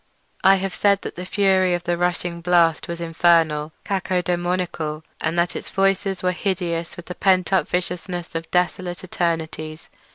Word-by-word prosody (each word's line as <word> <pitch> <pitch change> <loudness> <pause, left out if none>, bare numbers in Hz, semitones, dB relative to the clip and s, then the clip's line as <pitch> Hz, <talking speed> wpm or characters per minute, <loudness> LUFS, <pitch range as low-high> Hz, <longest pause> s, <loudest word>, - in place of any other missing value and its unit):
I 195 0 +7
have 195 -1 -2
said 200 0 +2
that - - -6
the 180 +1 -6
fury 190 -3 +3
of 175 - -5
the 175 0 0
rushing 175 0 -1
blast 170 -2 +3
was 170 0 -5
infernal—cacodaemoniacal—and 170 0 0
that 170 0 +1
its - - -5
voices 195 -1 +1
were 180 - +3
hideous 175 -3 -2
with 175 - -9
the 180 - -6
pent 185 0 +2
up 190 - +3
viciousness 180 0 -3
of 165 0 -4
desolate 180 0 -1
eternities. 160 -3 -3
175 Hz, 150 wpm, -22 LUFS, 170-185 Hz, -, I